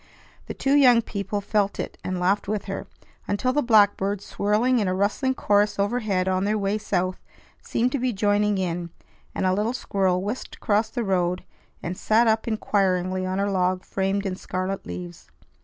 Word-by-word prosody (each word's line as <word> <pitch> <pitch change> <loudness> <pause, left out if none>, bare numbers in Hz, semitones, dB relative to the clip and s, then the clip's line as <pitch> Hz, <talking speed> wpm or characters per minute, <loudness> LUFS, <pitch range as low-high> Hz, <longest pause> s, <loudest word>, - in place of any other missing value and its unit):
The - - -5
two 275 - +1
young 250 -5 +6
people 200 -1 -3
felt 200 0 0
it, - - -4
and 185 -1 -3
laughed 190 +3 +1
with 210 -1 -2
her, 195 -1 -5 0.4
until 255 +5 0
the 295 - +2
blackbirds, 205 -4 +3
swirling 225 +5 +1
in 205 - 0
a 185 - 0
rustling 210 +7 0
chorus 205 -2 +2
overhead 200 -3 0
on 185 0 +1
their 210 +2 +1
way 200 +1 0
south, 185 -3 -1 0.4
seemed 245 +2 0
to 280 - -1
be 255 0 0
joining 205 0 +1
in, 175 -2 -2 0.5
and - - -1
a 185 - +3
little 210 +5 0
squirrel 190 -6 0
whisked 215 +6 -5
across 215 0 +1
the 240 0 -3
road 180 -3 0 0.4
and 175 +2 -3
sat 220 +5 +3
up 220 0 +1
inquiringly 185 -4 0
on 185 +1 -2
a 200 0 0
log 185 -1 0
framed 195 +1 -1
in 190 -1 -2
scarlet 185 +1 -4
leaves. 90 0 -8
200 Hz, 180 wpm, -24 LUFS, 185-215 Hz, 0.5 s, young